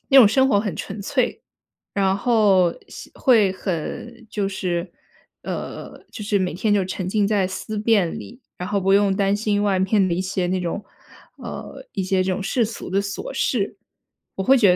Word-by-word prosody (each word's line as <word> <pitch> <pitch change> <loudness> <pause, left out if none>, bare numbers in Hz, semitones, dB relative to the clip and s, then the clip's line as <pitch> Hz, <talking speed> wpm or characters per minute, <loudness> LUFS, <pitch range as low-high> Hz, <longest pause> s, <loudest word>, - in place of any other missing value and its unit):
那 270 - +7
种 230 -6 +9
生 265 +4 +3
活 205 - +3
很 205 -3 -3
纯 215 - -6
粹， 255 +4 0 0.5
然 195 -1 +2
后 200 -6 +4 0.2
像 - - -10
会 225 -8 +5
很， 220 +6 -5
就 205 -2 -1
是， 180 -2 -2 0.5
呃， - - -6
就 210 - -7
是 205 -1 +1
每 180 -3 -1
天 205 +4 0
就 200 - +3
沉 185 0 -4
浸 205 0 +2
在 200 -3 +2
思 195 +3 -5
辨 210 -6 +2
里， 240 +3 -11 0.2
然 180 - -4
后 205 -1 +1
不 195 +1 +3
用 200 -1 +4
担 195 0 +2
心 205 -1 0
外 195 -2 +2
面 195 +1 +3
的 175 - 0
一 175 - -1
些 190 -1 -1
那 185 +1 0
种， 180 +4 -3 0.5
呃， - - -8
一 190 - -1
些 185 0 +1
这 190 - 0
种 185 - -2
世 235 +5 +1
俗 225 - -7
的 195 +1 +2
琐 200 0 -5
事， 205 -6 0 0.6
我 190 - -2
会 265 +7 +6
觉 210 -6 +5
得 180 - +5
200 Hz, 215 characters per minute, -22 LUFS, 190-215 Hz, 0.6 s, 种